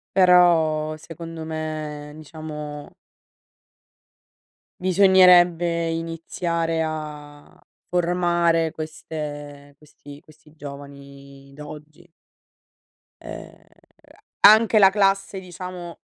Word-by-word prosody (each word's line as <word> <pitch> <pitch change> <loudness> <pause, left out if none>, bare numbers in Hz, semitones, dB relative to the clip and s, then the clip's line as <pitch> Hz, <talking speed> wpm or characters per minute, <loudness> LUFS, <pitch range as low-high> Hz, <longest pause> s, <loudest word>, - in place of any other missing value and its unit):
Però, 165 -4 +4
secondo 165 +1 -9
me 155 -2 -6
diciamo 150 -1 -9 1.9
bisognerebbe 175 -3 +4
iniziare 165 0 -3
a 150 -2 -8 0.4
formare 175 -2 +1
queste 145 -2 -8
questi 145 -1 -15
questi 155 -1 -22
giovani 140 -1 -12
d'oggi. 150 +3 -12 1.1
Ehm, - - -10 0.8
anche 215 +1 +7
la 195 -2 +7
classe 195 -1 0
diciamo, 180 -1 -9
160 Hz, 65 wpm, -22 LUFS, 150-175 Hz, 1.9 s, anche